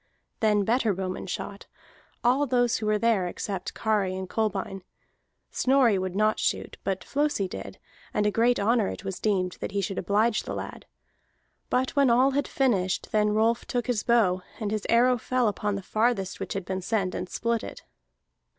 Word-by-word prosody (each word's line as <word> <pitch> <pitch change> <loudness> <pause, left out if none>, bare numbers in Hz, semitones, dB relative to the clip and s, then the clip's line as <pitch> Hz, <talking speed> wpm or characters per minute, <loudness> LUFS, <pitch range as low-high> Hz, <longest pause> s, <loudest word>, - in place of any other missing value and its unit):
Then 210 -2 +3
better 225 -1 +1
bowmen 185 0 -4
shot, 200 +2 -6 0.6
all 260 +4 +3
those 245 -2 +2
who 215 - -3
were 215 0 +3
there 215 -5 +2
except 195 +2 -5
Kari 205 -4 0
and 190 0 -5
Kolbein. 195 -2 -2 0.7
Snorri 255 -6 +3
would 185 -1 -3
not 215 +1 +2
shoot, - - -1
but 195 -1 -2
Flosi 290 -9 0
did, - - -8 0.3
and 210 - 0
a 210 - +3
great 235 +3 +2
honor 220 0 +2
it - - -6
was 190 -1 -4
deemed 185 -4 0
that - - -5
he 200 - 0
should 195 0 -2
oblige 215 +4 +2
the - - -5
lad. - - -7 0.8
But 255 +1 0
when 280 -2 +4
all 255 +3 +4
had 285 +1 0
finished, 195 -9 0
then 210 -1 +3
Rolf 225 +2 +2
took 245 -1 -1
his 245 -4 0
bow, 205 -7 +3 0.2
and 210 -3 -2
his 215 -1 -2
arrow 245 +1 +4
fell 255 0 +1
upon 210 0 -1
the 200 - -5
farthest 215 -3 0
which - - -4
had 195 -2 -4
been 190 0 -3
sent, 190 -2 -1
and 180 - -4
split 235 -1 -1
it. - - -8
215 Hz, 185 wpm, -27 LUFS, 195-240 Hz, 0.8 s, when